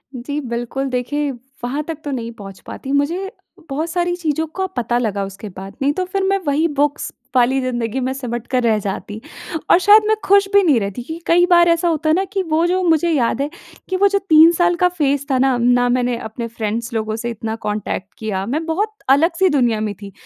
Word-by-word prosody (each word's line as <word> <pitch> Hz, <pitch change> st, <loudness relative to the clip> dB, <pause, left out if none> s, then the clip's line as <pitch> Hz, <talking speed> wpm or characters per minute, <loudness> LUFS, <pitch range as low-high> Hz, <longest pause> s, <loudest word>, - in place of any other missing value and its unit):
जी 285 Hz, +4 st, -4 dB
बिल्कुल 240 Hz, +3 st, -3 dB
देखिए 275 Hz, +3 st, -1 dB, 0.3 s
वहाँ 275 Hz, +5 st, -2 dB
तक 325 Hz, -2 st, -4 dB
तो 290 Hz, -, -4 dB
नहीं 235 Hz, -3 st, -4 dB
पहुँच 195 Hz, -4 st, -11 dB
पाती, 270 Hz, -, -6 dB
मुझे 335 Hz, +8 st, 0 dB, 0.4 s
बहुत 305 Hz, +5 st, -2 dB
सारी 350 Hz, +1 st, 0 dB
चीज़ों 320 Hz, -2 st, -1 dB
का 380 Hz, 0 st, -1 dB
पता 240 Hz, 0 st, 0 dB
लगा 210 Hz, -5 st, -1 dB
उसके 195 Hz, +2 st, -9 dB
बाद 195 Hz, +1 st, -8 dB
नहीं 280 Hz, +1 st, +2 dB
तो 370 Hz, +4 st, -2 dB
फ़िर 385 Hz, +1 st, -2 dB
मैं 390 Hz, +1 st, +2 dB
वही 295 Hz, +4 st, +2 dB
बुक्स 290 Hz, -1 st, -1 dB, 0.2 s
वाली 255 Hz, +2 st, +3 dB
ज़िंदगी 240 Hz, -1 st, -2 dB
में 260 Hz, -, -1 dB
सिमट 240 Hz, -3 st, -5 dB
कर 255 Hz, -1 st, +1 dB
रह 225 Hz, -2 st, +3 dB
जाती 205 Hz, +2 st, -4 dB, 0.5 s
और -, -, +8 dB
शायद 415 Hz, +3 st, +6 dB
मैं 435 Hz, -, +3 dB
खुश 400 Hz, 0 st, +4 dB
भी 405 Hz, -, +7 dB
नहीं 295 Hz, -9 st, +4 dB
रहती 200 Hz, +3 st, -4 dB
कि 320 Hz, +6 st, -6 dB
कई 350 Hz, +1 st, +5 dB
बार 345 Hz, -1 st, +6 dB
ऐसा 335 Hz, +1 st, +2 dB
होता 315 Hz, -1 st, 0 dB
है 310 Hz, -, +4 dB
ना 380 Hz, -, +1 dB
कि 390 Hz, -, +1 dB
वो 325 Hz, 0 st, +1 dB
जो 370 Hz, +1 st, +1 dB
मुझे 335 Hz, -1 st, +3 dB
याद 275 Hz, -4 st, +1 dB
है 285 Hz, -, -1 dB, 0.4 s
कि 375 Hz, -, -1 dB
वो 400 Hz, +2 st, +5 dB
जो 400 Hz, 0 st, +1 dB
3 325 Hz, -3 st, +6 dB
साल 350 Hz, +1 st, +2 dB
का 360 Hz, +1 st, +3 dB
फेज़ 285 Hz, -5 st, 0 dB
था 265 Hz, -, +3 dB
ना, 260 Hz, 0 st, +3 dB
ना 245 Hz, +1 st, +3 dB
मैंने 245 Hz, -1 st, +1 dB
अपने 230 Hz, +1 st, -6 dB
फ्रेंड्स 230 Hz, +1 st, -4 dB
लोगों 220 Hz, -1 st, -2 dB
से 235 Hz, +1 st, -4 dB
इतना 225 Hz, -1 st, -4 dB
कॉन्टैक्ट 210 Hz, -2 st, -3 dB
किया 195 Hz, -3 st, -3 dB
मैं 305 Hz, +8 st, -2 dB
बहुत 370 Hz, +7 st, 0 dB, 0.2 s
अलग-सी 330 Hz, +6 st, +3 dB
दुनिया 245 Hz, -7 st, +2 dB
में 215 Hz, -1 st, -2 dB
थी। 200 Hz, -1 st, -8 dB
275 Hz, 220 wpm, -19 LUFS, 235-335 Hz, 0.5 s, और